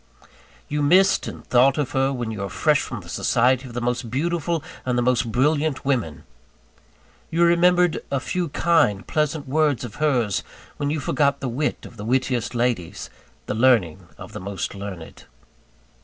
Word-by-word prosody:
You 150 0 -2
missed 185 +7 +4
and - - -8
thought 130 +3 +4
of 145 -2 -1
her, 135 -1 +1
when 120 -4 -3
you 110 - -6
were 100 0 -3
fresh - - +2
from - - -6
the - - -15
society 130 +2 +1
of 120 - -11
the 120 - -2
most 120 0 -2
beautiful 165 +4 -1 0.2
and 125 -1 -1
the 120 - +2
most 120 -2 +1
brilliant 145 +4 +1
women. 120 - -1 1.1
You 170 +1 +2
remembered 175 0 +3
a 140 - 0
few 175 +5 -2
kind, 150 - +2
pleasant 150 -1 -1
words 150 -2 +1
of 115 -4 -8
hers 120 -10 +1 0.4
when 145 - -1
you 155 +1 -1
forgot 140 0 +1
the 130 - -3
wit 145 +6 -2
of 120 - -13
the 105 - -7
wittiest 125 -1 0
ladies, 110 -7 -2 0.3
the - - -3
learning 110 -8 +2
of - - -10
the - - -6
most 95 -3 -4
learned. 100 -4 -9
130 Hz, 170 wpm, -23 LUFS, 115-150 Hz, 1.1 s, missed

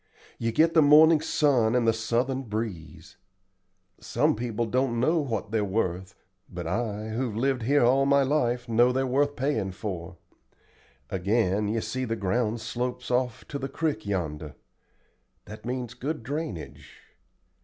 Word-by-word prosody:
You 115 0 0
get 160 +7 +3
the 160 - +6
morning 155 +2 +7
sun 135 -8 +2
and 120 -2 +2
the 115 - +4
southern 120 +4 -1
breeze. 105 - -6 0.8
Some - - +1
people 115 0 -2
don't 120 +1 0
know 160 +7 +2
what 115 -9 -3
they're 110 -2 +1
worth, 95 -2 -2 0.3
but 85 -1 -6
I, 105 +3 -2
who've 115 0 -2
lived 130 +1 0
here 140 +4 +3
all 135 +3 +3
my 140 0 +4
life, 125 -4 0
know 120 +2 +4
they're 130 +1 0
worth 145 +3 +1
payin' 125 -8 -1
for. 90 -3 -6 0.9
Again, 100 +1 +1
you 110 +2 -1
see 130 +3 -3
the 115 -1 -2
ground 110 +3 -1
slopes 125 +2 -4
off 125 -2 -1
to 140 - -4
the 135 0 -4
crick 155 -9 -2
yonder. 80 -7 -4 0.9
That 110 +1 -11
means 125 -2 -3
good 135 +1 -4
drainage. 90 - -6
120 Hz, 150 wpm, -27 LUFS, 105-135 Hz, 0.9 s, morning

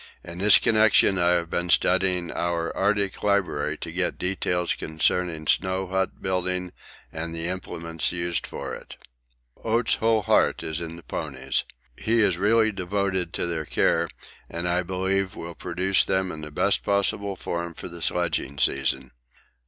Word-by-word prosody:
In 85 +1 -8
this 105 +1 +7
connection 110 -3 +4
I 85 0 +4
have 85 -1 -1
been 85 0 -1
studying 90 -1 +2
our 85 -1 -2
Arctic 100 0 0
library 90 -7 0
to 80 - -5
get 90 +1 -1
details 90 -1 0
concerning 80 +1 -1
snow 95 +4 +1
hut 95 +1 -2
building 90 -1 -1 0.4
and 80 +1 -4
the 80 0 -3
implements 85 -3 -3
used 85 -1 -2
for - - -6
it. - - -9 0.7
Oates' 115 +1 +2
whole 110 -1 +2
heart - - +2
is 80 +1 -4
in 85 0 -6
the 85 - -12
ponies. 65 -3 -2 0.3
He 115 - +1
is 90 -4 +2
really 110 +2 +3
devoted 95 -2 -1
to - - -1
their 85 -2 -2
care, 85 +3 +1 0.4
and 85 +1 -3
I 90 +1 +2
believe 95 +1 -1
will 85 +1 -7
produce 90 +3 +1
them 95 -1 0
in 80 - -7
the 75 - -7
best 75 - +2
possible 100 0 0
form 85 -1 -4
for - - -7
the 85 -1 -10
sledging 80 -4 -1
season. 65 -1 0
90 Hz, 160 wpm, -25 LUFS, 85-95 Hz, 0.7 s, this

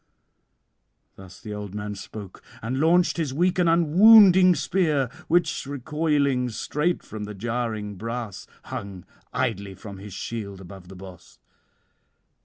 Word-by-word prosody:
Thus 95 -1 -13
the 105 - -8
old 105 -1 -7
man 105 0 -4
spoke, 100 -1 -10 0.2
and 125 +4 -2
launched 175 +4 +3
his 150 -6 -2
weak 180 +3 +1
and 175 -2 +3
unwounding 185 +2 +7
spear, 150 -8 0 0.2
which, 175 -4 +1
recoiling 140 -2 0
straight 150 +9 -2
from 110 -1 -7
the 105 0 -8
jarring 110 -2 -3
brass, 115 -1 -6 0.2
hung 95 -3 -7 0.3
idly 100 0 -2
from 100 0 -10
his 100 0 -10
shield 100 -2 -6
above 95 -1 -12
the 95 - -11
boss. 90 -3 -13
115 Hz, 130 wpm, -24 LUFS, 100-160 Hz, 0.3 s, unwounding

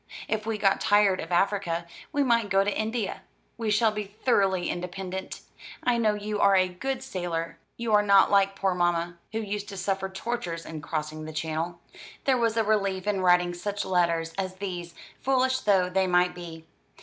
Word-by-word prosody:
If 215 0 -2
we 225 -1 -1
got 195 -1 +2
tired 205 -2 +4
of 165 - -8
Africa 175 -2 +1 0.3
we 290 -2 +2
might 230 -5 +2
go 195 0 +4
to 205 0 -1
India. 220 -1 -2 0.3
We 225 -2 -2
shall 215 +1 +3
be 210 0 -4
thoroughly 195 -4 +1
independent. 185 +1 -5 0.4
I 245 -1 +2
know 215 -2 +2
you 210 0 -3
are 200 -1 +5
a 185 -1 +4
good 260 +8 -4
sailor; 175 -8 -4 0.2
you 235 -2 -1
are 210 - +6
not 200 -1 +5
like 195 -1 +4
poor 195 -1 +1
mamma, 175 -1 0
who 220 - -2
used 205 -1 -4
to 200 - -7
suffer 190 +1 -1
tortures 190 -4 -4
in 160 -1 -7
crossing 155 +1 -4
the 155 - -7
Channel." 160 +2 -3 0.5
There 265 -2 +3
was 230 -1 +1
a 225 - +4
relief 200 -3 0
in 205 -2 0
writing 180 -1 +4
such 205 +3 -3
letters 170 -3 +1
as 185 -1 -3
these, 180 -3 -6 0.2
foolish 260 0 +2
though 195 -5 +3
they 190 +1 +1
might 180 0 +3
be. 165 -2 -9
195 Hz, 185 wpm, -27 LUFS, 175-210 Hz, 0.5 s, are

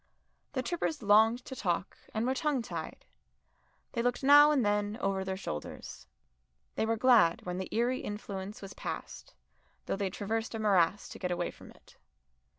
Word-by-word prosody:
The 255 -2 -1
trippers 315 -2 -2
longed 220 +4 +4
to 265 - -7
talk 180 -4 -2 0.2
and 220 +1 -1
were 260 - +1
tongue 275 -2 0
tied; - - -7 0.9
they 235 - -1
looked 245 +2 -1
now 290 +2 +8
and 280 -7 +2
then 205 +1 0
over 195 -4 0
their 190 0 -3
shoulders. 75 - -7 0.7
They 220 - -1
were 225 0 +1
glad 225 -8 +4
when 180 0 -3
the 190 - -5
eerie 240 +3 +1
influence 205 -1 -6
was 195 - -8
passed, - - -7 0.5
though - - -1
they 195 -1 -1
traversed 220 +4 -3
a - - -3
morass 200 -2 +2
to - - -10
get 180 - -2
away 175 -1 -1
from - - -15
it. - - -19
215 Hz, 170 wpm, -31 LUFS, 195-245 Hz, 0.9 s, now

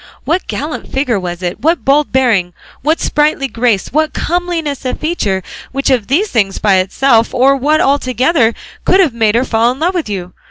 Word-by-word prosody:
What 345 +4 -1
gallant 300 +2 -5
figure 260 -6 0
was 175 -1 -6
it, 175 0 -3
what 325 +3 +1
bold 285 +2 +2
bearing, 220 -9 +1 0.3
what 310 +4 +1
sprightly 295 -2 +1
grace, 230 -5 -1
what 310 +1 +1
comeliness 335 -4 -2
of 255 - -3
feature, 210 - -1 0.3
which 275 0 0
of 240 -6 +1
these 365 +11 +1
things 200 -5 0
by 200 -3 +2
itself, 230 +5 +2
or 270 +2 +4
what 295 +4 +1
all 280 +1 +3
together, 255 -1 +1 0.3
could 375 - +3
have 335 -10 +3
made 225 -2 +1
her 245 +2 +2
fall 230 0 +2
in 255 - -6
love 350 +4 +1
with 340 - -3
you? 180 -3 -5
265 Hz, 195 wpm, -14 LUFS, 225-305 Hz, 0.3 s, or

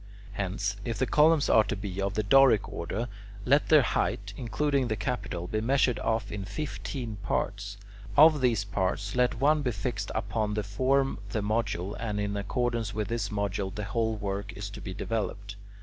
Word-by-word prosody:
Hence, 100 0 -2
if 115 -1 -3
the 130 - +1
columns 150 +2 +4
are 110 - +6
to - - -2
be 100 -1 -4
of 100 +1 -1
the 110 - +1
Doric 135 -1 +5
order, 105 +8 -4 0.4
let 140 +3 +3
their 155 -3 +7
height, 105 -3 -1
including 135 +3 0
the 110 - -1
capital, 105 -6 -3
be 110 +4 -2
measured 130 +1 +2
off 110 -2 -1
into 100 -1 -5
fifteen 125 -3 -4
parts. 100 0 -2 0.4
Of 155 -1 +7
these 115 -5 +2
parts, 100 +1 -2
let 125 -2 +2
one 150 +3 +4
be 130 - 0
fixed 105 -2 -3
upon 105 0 -1
to 105 - -1
form 130 +7 +1
the 105 +1 -1
module, 105 -3 -1
and 105 -3 -2
in 100 0 -1
accordance 115 +1 -1
with 105 -2 -2
this 115 -3 -1
module 100 -2 -2
the 105 - -3
whole 110 +2 0
work 100 -1 -4
is 100 0 -6
to - - -9
be 95 -2 -6
developed. 100 -2 -3
105 Hz, 180 wpm, -28 LUFS, 100-125 Hz, 0.4 s, their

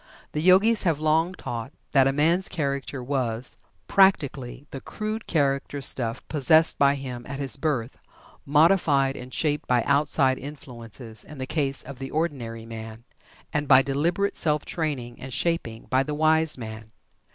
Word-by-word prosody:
The 150 - -2
Yogis 190 +6 +5
have 165 -6 0
long 160 +4 +1
taught 120 -3 -6 0.2
that 135 -2 +5
a - - +3
man's 165 +7 +2
character 140 -5 -3
was, 125 -3 -2 0.3
practically, 140 -9 +2
the 135 - -7
crude 215 +6 -5
character 140 -2 0
stuff 120 -4 -1
possessed 155 +2 +4
by 140 0 +4
him 130 -3 -6
at 140 - -5
his 135 -2 +2
birth, 135 -5 -2 0.4
modified 145 -3 +3
and 125 +1 -9
shaped 150 +1 -1
by 125 -2 +2
outside 140 -2 +2
influences 120 -6 -5
in 150 - -12
the 130 - -4
case 140 -2 -1
of 135 -1 -10
the 135 0 -5
ordinary 125 -8 -3
man, 110 0 -9 0.5
and 150 -1 -1
by 135 -1 +7
deliberate 170 +9 0
self 150 -2 0
training 140 -8 -4
and 130 -1 -6
shaping 145 -10 -2
by 130 0 +1
the 150 +2 -3
wise 155 0 +2
man. 110 -2 -8
140 Hz, 155 wpm, -25 LUFS, 125-155 Hz, 0.5 s, by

